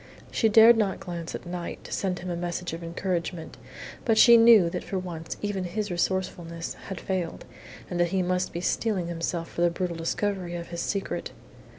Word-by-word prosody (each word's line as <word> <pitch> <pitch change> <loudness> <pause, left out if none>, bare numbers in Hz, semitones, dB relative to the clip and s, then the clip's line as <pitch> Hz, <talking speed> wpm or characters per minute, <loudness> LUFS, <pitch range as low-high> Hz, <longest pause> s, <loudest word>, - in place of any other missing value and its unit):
She 225 - +2
dared 225 +2 +8
not 205 -3 0
glance 170 -2 -6
at - - -8
Knight, 175 -1 -6
to - - -11
send 185 -2 -1
him 180 0 -5
a - - -2
message 175 0 -3
of 165 +1 -6
encouragement, 170 -1 -3 0.5
but 225 -2 +2
she 235 +1 +9
knew 225 -5 +7
that 175 +1 -3
for 195 - -3
once 170 -3 -5
even 205 -2 -1
his 205 +3 -3
resourcefulness 175 -2 -2 0.2
had 195 - -5
failed, 185 -3 -3 0.4
and 175 - -4
that 175 - +4
he 185 +1 0
must 180 +1 0
be 170 - -4
steeling 185 -3 0
himself 165 0 -3
to - - -3
the 175 - +5
brutal 175 0 -3
discovery 180 +1 -2
of 170 0 -6
his 170 0 -4
secret. 200 -1 -3
180 Hz, 195 wpm, -27 LUFS, 170-195 Hz, 0.5 s, she